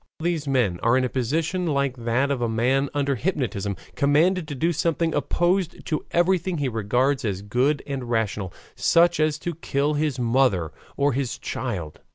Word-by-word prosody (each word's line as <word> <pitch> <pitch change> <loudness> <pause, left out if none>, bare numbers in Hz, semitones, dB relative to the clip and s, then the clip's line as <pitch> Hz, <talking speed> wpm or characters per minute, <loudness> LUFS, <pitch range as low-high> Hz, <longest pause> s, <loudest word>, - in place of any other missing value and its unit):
All - - -8
these 165 -4 -1
men 120 -11 +1
are 120 +2 +3
in 130 - +2
a 125 - 0
position 160 +9 -1
like 140 -3 0
that 120 +3 0
of 135 -3 -1
a 120 - 0
man 130 +5 +1
under 140 -1 0
hypnotism, 115 - -2 0.2
commanded 155 +5 +2
to 145 - -5
do 165 +6 +1
something 165 +1 0
opposed 175 0 0
to 155 -3 -2
everything 180 0 +1
he 145 -2 0
regards 125 +5 0
as 100 -3 -2
good 130 +7 +1
and 135 -4 -5
rational, 105 -5 -1 0.2
such 170 +1 +3
as 155 -1 +2
to 170 +2 -4
kill 145 -2 -1
his 150 -2 0
mother 120 - +2 0.3
or 140 0 +2
his 130 -1 -2
child. 90 -12 -4
140 Hz, 180 wpm, -24 LUFS, 120-160 Hz, 0.3 s, are